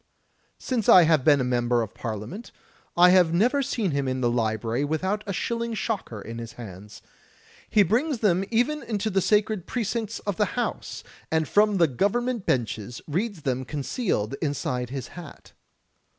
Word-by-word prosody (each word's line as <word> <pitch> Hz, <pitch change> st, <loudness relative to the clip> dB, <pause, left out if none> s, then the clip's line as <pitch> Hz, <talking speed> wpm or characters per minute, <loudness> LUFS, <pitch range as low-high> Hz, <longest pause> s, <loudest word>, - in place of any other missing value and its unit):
Since 240 Hz, -5 st, -1 dB
I 180 Hz, -, +9 dB
have 160 Hz, -4 st, +3 dB
been 145 Hz, -1 st, +5 dB
a -, -, +1 dB
member 120 Hz, -1 st, +1 dB
of 110 Hz, -, -8 dB
Parliament, 115 Hz, -, -6 dB, 0.5 s
I 180 Hz, +1 st, +7 dB
have 175 Hz, -3 st, +4 dB
never 250 Hz, +10 st, +3 dB
seen 225 Hz, -8 st, -1 dB
him 140 Hz, -1 st, -1 dB
in 130 Hz, 0 st, -1 dB
the 120 Hz, -2 st, +1 dB
library 115 Hz, +2 st, -1 dB
without 190 Hz, +8 st, -1 dB
a -, -, -2 dB
shilling 230 Hz, +4 st, -2 dB
shocker 205 Hz, -, -3 dB
in 115 Hz, +3 st, -7 dB
his 115 Hz, -1 st, -7 dB
hands. 105 Hz, -3 st, -11 dB, 0.7 s
He 210 Hz, -, +5 dB
brings 250 Hz, -, +1 dB
them 195 Hz, -4 st, +2 dB
even 245 Hz, +6 st, +1 dB
into 215 Hz, -1 st, -2 dB
the 195 Hz, 0 st, +2 dB
sacred 210 Hz, -2 st, +1 dB
precincts 225 Hz, -1 st, -2 dB
of 205 Hz, -3 st, -3 dB
the 210 Hz, +3 st, -1 dB
House, 245 Hz, -, -3 dB, 0.3 s
and 160 Hz, -1 st, +1 dB
from 210 Hz, -1 st, +3 dB
the 170 Hz, -, +5 dB
Government 220 Hz, -, -1 dB
benches 120 Hz, -2 st, -1 dB
reads 185 Hz, +2 st, -2 dB
them 130 Hz, -1 st, -1 dB
concealed 140 Hz, -, -2 dB
inside 130 Hz, -5 st, -2 dB
his 130 Hz, -2 st, -5 dB
hat. 175 Hz, -4 st, -12 dB
175 Hz, 165 wpm, -25 LUFS, -, 0.7 s, I